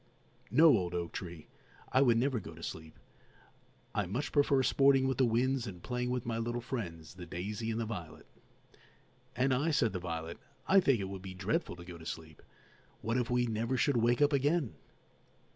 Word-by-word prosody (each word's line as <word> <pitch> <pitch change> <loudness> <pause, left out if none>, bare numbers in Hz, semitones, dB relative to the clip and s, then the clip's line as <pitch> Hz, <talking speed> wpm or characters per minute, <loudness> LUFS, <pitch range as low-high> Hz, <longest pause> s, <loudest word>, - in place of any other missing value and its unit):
No, 150 +6 +7
old 90 -4 -1
oak 85 -1 -3
tree, 85 -3 -7 0.5
I 130 - +4
would 120 -4 +5
never 130 0 +1
go 85 -4 -10
to 85 - -11
sleep; 80 -1 -7 1.0
I 105 -3 0
much 120 +11 -3
prefer 140 -2 +3
sporting 135 0 +4
with 130 -1 -1
the 130 - +5
winds 125 +2 +1
and 90 -3 -8
playing 125 -1 -2
with 125 -1 -2
my 115 -1 -2
little 120 +1 -2
friends, 90 - -5
the 90 -1 -10
daisy 105 +5 -4
and 115 0 -1
the 115 - -1
violet." 85 -8 -7 1.1
"And 130 +2 +2
I," 145 +6 +1
said 115 -9 +2
the 90 - -2
violet, 85 -2 -5 0.3
"I 195 - +6
think 135 - +3
it 95 - -4
would 95 -1 -6
be 95 -1 -8
dreadful 100 - -1
to 85 0 -11
go 85 -2 -9
to 80 - -12
sleep. 80 -2 -7 0.6
What 115 +3 0
if 125 0 0
we 125 0 +2
never 115 +3 -1
should 140 0 +2
wake 120 +4 +3
up 145 +1 +3
again!" 145 -1 +1
115 Hz, 195 wpm, -32 LUFS, 90-130 Hz, 1.1 s, No